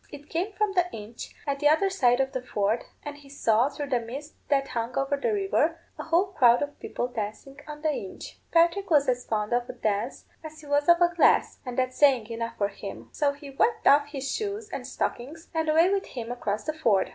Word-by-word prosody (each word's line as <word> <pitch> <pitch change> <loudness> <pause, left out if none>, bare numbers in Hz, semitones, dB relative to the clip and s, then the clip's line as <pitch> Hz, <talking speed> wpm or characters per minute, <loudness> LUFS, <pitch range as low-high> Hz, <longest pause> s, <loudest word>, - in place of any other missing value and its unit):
It 290 0 -11
came 355 +6 -1
from 415 0 0
the 360 -1 +1
inch 220 +2 -9
at 280 -1 -2
the 295 0 +4
other 385 +6 +3
side 250 -9 +3
of 265 0 +1
the 260 -2 -3
ford, 215 -1 -1 0.2
and 290 0 -6
he 285 -1 -16
saw, 240 -2 +2
through 290 -1 -6
the 250 -3 +2
mist 270 +6 -8 0.2
that 275 -2 +2
hung 235 +2 -3
over 275 +1 +1
the 285 +11 -1
river, 390 -5 +1 0.2
a - - -2
whole 355 +4 +1
crowd 245 -6 +5
of 290 0 -7
people 245 - -3
dancing 240 +4 -6
on 300 0 -9
the 310 - +2
inch. 195 -9 -7
Patrick 340 +4 +3
was 290 -4 +4
as 250 -1 0
fond 210 +1 -1
of 240 0 0
a - - -4
dance, 215 +4 -2 0.2
as 315 0 -9
he 305 - -13
was 290 +2 +1
of 345 0 +7
a 350 0 +4
glass, 345 - +3
and 245 - -5
that's 255 0 0
saying 270 -6 +5
enough 230 0 -4
for 200 -1 +1
him; - - -9
so 285 -2 +1
he 280 0 -11
whipped 450 - +1
off 285 +1 +6
his 275 -2 -5
shoes 425 +1 -4
and - - -5
stockings, 300 +7 -4
and 320 -1 0
away 330 +4 +5
with 395 0 -1
him 235 -2 -6
across 215 -4 -2
the 310 - -2
ford. 230 -12 +2
285 Hz, 230 wpm, -27 LUFS, 245-320 Hz, 0.2 s, of